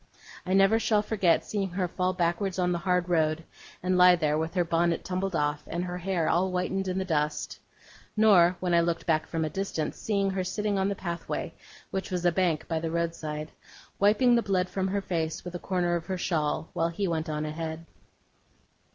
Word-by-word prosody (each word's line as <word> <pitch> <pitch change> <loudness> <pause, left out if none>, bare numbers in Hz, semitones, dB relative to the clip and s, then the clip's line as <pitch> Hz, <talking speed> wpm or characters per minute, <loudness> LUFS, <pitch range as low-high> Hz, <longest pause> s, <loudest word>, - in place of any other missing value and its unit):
I 185 - 0
never 195 +3 +5
shall 215 -2 +2
forget 195 -6 +2
seeing 200 -2 -2
her 180 0 -1
fall 180 +1 0
backward 180 +1 -1
on 180 -1 +1
the 175 - 0
hard 180 0 +1
road, 160 -2 +1 0.4
and 180 0 +2
lie 180 0 +8
there 155 -3 +1
with 160 +3 -2
her 175 -1 +2
bonnet 170 0 +1
tumbled 185 0 -2
off, 150 -1 0
and 170 +2 -3
her 180 0 -4
hair 180 -3 -1
all 180 +3 +2
whitened 190 +1 -1
in 185 0 -1
the 190 - -1
dust; 150 -3 -1 0.6
nor, 185 -5 +5
when 180 -1 -1
I 170 - +5
looked 170 0 -1
back 155 -2 +1
from 160 -1 -1
a - - -2
distance, 195 -6 -3
seeing 200 -2 0
her 190 -1 -1
sitting 205 +1 -1
on 190 +1 +1
the 200 - -2
pathway, 170 -2 -4 0.4
which 190 - -3
was 180 -2 -2
a 175 - +5
bank 170 -3 0
by 165 -1 -1
the 165 0 -3
roadside, 160 -2 -3 0.5
wiping 215 +5 +4
the 235 - +4
blood 185 -3 0
from 190 -1 -1
her 200 +1 -1
face 165 -3 -2
with 180 - -6
a 175 - -4
corner 175 -2 0
of 170 -1 -4
her 190 -1 -2
shawl, 160 -3 -1
while 165 0 +1
he 190 +4 -2
went 160 -1 -2
on 150 0 -2
ahead. 160 +1 -5
180 Hz, 210 wpm, -28 LUFS, 165-190 Hz, 0.6 s, lie